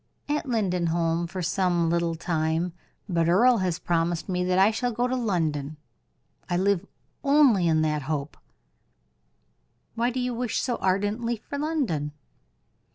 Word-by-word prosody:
"At 295 Hz, 0 st, -1 dB
Lindenholm 175 Hz, -6 st, 0 dB
for 185 Hz, +1 st, -5 dB
some 175 Hz, -1 st, +1 dB
little 170 Hz, -1 st, 0 dB
time: 160 Hz, +1 st, -1 dB, 0.3 s
but 170 Hz, -3 st, +1 dB
Earle 235 Hz, +6 st, +5 dB
has 180 Hz, -3 st, 0 dB
promised 170 Hz, 0 st, -1 dB
me 180 Hz, -2 st, -1 dB
that 180 Hz, 0 st, +1 dB
I 195 Hz, +3 st, +5 dB
shall 245 Hz, +2 st, -1 dB
go 240 Hz, +2 st, 0 dB
to 255 Hz, -, -1 dB
London. 155 Hz, -, -1 dB, 0.7 s
I 175 Hz, -, +1 dB
live 200 Hz, 0 st, +1 dB, 0.4 s
only 275 Hz, -, +4 dB
in 155 Hz, -1 st, +3 dB
that 150 Hz, -1 st, 0 dB
hope." 145 Hz, -1 st, -2 dB, 1.6 s
"Why 235 Hz, +1 st, +1 dB
do 255 Hz, +1 st, -3 dB
you 250 Hz, 0 st, -1 dB
wish 240 Hz, -1 st, -1 dB
so 245 Hz, -3 st, -1 dB
ardently 205 Hz, +5 st, 0 dB
for 280 Hz, +6 st, -7 dB
London?" 245 Hz, -, -1 dB
185 Hz, 145 wpm, -26 LUFS, 165-235 Hz, 1.6 s, Earle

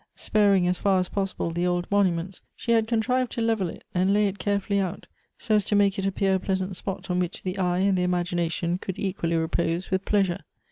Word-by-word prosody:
Sparing, 200 Hz, -4 st, +3 dB
as 180 Hz, 0 st, 0 dB
far 195 Hz, -2 st, +3 dB
as 180 Hz, -, -2 dB
possible, 195 Hz, -4 st, -2 dB
the 175 Hz, +2 st, 0 dB
old 175 Hz, 0 st, 0 dB
monuments, 185 Hz, -2 st, +1 dB
she 235 Hz, -, -3 dB
had 225 Hz, -1 st, +3 dB
contrived 245 Hz, +2 st, +1 dB
to -, -, -4 dB
level 225 Hz, -5 st, +1 dB
it, -, -, -10 dB
and 185 Hz, +2 st, +2 dB
lay 210 Hz, +1 st, +3 dB
it 195 Hz, 0 st, -5 dB
carefully 200 Hz, +1 st, 0 dB
out, 185 Hz, -3 st, -3 dB, 0.3 s
so 225 Hz, -, -2 dB
as 210 Hz, -1 st, +4 dB
to 210 Hz, -, 0 dB
make 200 Hz, 0 st, +3 dB
it 195 Hz, -, 0 dB
appear 195 Hz, 0 st, +1 dB
a 190 Hz, -, +2 dB
pleasant 190 Hz, 0 st, -2 dB
spot 190 Hz, 0 st, -5 dB
on 180 Hz, -, +1 dB
which 180 Hz, 0 st, -3 dB
the 185 Hz, +1 st, -3 dB
eye 180 Hz, -1 st, +1 dB
and 195 Hz, +1 st, +2 dB
the 180 Hz, -, +1 dB
imagination 175 Hz, -1 st, 0 dB
could 190 Hz, 0 st, -5 dB
equally 180 Hz, -4 st, -1 dB
repose 165 Hz, +2 st, -1 dB
with 190 Hz, 0 st, +1 dB
pleasure. 195 Hz, -3 st, +1 dB
190 Hz, 225 wpm, -26 LUFS, 180-200 Hz, 0.3 s, as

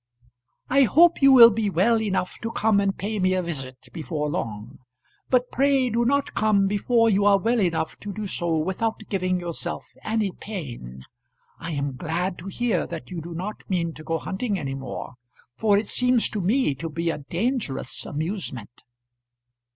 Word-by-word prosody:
I 275 Hz, +1 st, +4 dB
hope 340 Hz, +8 st, +5 dB
you 275 Hz, 0 st, +7 dB
will 235 Hz, -3 st, +10 dB
be 215 Hz, -1 st, 0 dB
well 220 Hz, +6 st, +2 dB
enough 195 Hz, -4 st, -2 dB
to 225 Hz, -, -3 dB
come 220 Hz, -2 st, +2 dB
and 195 Hz, -1 st, 0 dB
pay 210 Hz, +2 st, -3 dB
me 185 Hz, 0 st, +2 dB
a 185 Hz, -, 0 dB
visit 135 Hz, -6 st, -6 dB
before 150 Hz, -2 st, -3 dB
long, 115 Hz, -2 st, -5 dB, 0.5 s
but 250 Hz, -1 st, +2 dB
pray 270 Hz, -2 st, +2 dB
do 235 Hz, +2 st, +1 dB
not 280 Hz, +3 st, +1 dB
come 215 Hz, -2 st, +3 dB
before 230 Hz, +4 st, +2 dB
you 200 Hz, -2 st, +3 dB
are 200 Hz, -1 st, +5 dB
well 230 Hz, +4 st, +1 dB
enough 170 Hz, -5 st, -1 dB
to 205 Hz, -, -6 dB
do 215 Hz, +1 st, -5 dB
so 170 Hz, -4 st, -1 dB
without 190 Hz, +7 st, -2 dB
giving 185 Hz, -2 st, 0 dB
yourself 170 Hz, -2 st, -4 dB
any 215 Hz, -3 st, 0 dB
pain. 120 Hz, -, -8 dB, 0.6 s
I 165 Hz, 0 st, -5 dB
am 140 Hz, -2 st, -3 dB
glad 175 Hz, +4 st, -2 dB
to 180 Hz, -, -9 dB
hear 210 Hz, -2 st, -1 dB
that 170 Hz, +1 st, -8 dB
you 175 Hz, -2 st, -4 dB
do 170 Hz, +1 st, -8 dB
not 195 Hz, +5 st, -5 dB
mean 170 Hz, -3 st, -1 dB
to 155 Hz, -, -11 dB
go 165 Hz, +1 st, -1 dB
hunting 195 Hz, +6 st, -3 dB
any 135 Hz, -5 st, -4 dB
more, 135 Hz, -2 st, -6 dB, 0.4 s
for 205 Hz, +3 st, +3 dB
it 205 Hz, +1 st, -1 dB
seems 250 Hz, -2 st, +2 dB
to 210 Hz, -, -3 dB
me 215 Hz, -, +2 dB
to 160 Hz, +5 st, -6 dB
be 165 Hz, +2 st, -1 dB
a -, -, -5 dB
dangerous 160 Hz, -, -2 dB
amusement. 155 Hz, -, -4 dB
190 Hz, 180 wpm, -24 LUFS, 160-220 Hz, 0.6 s, will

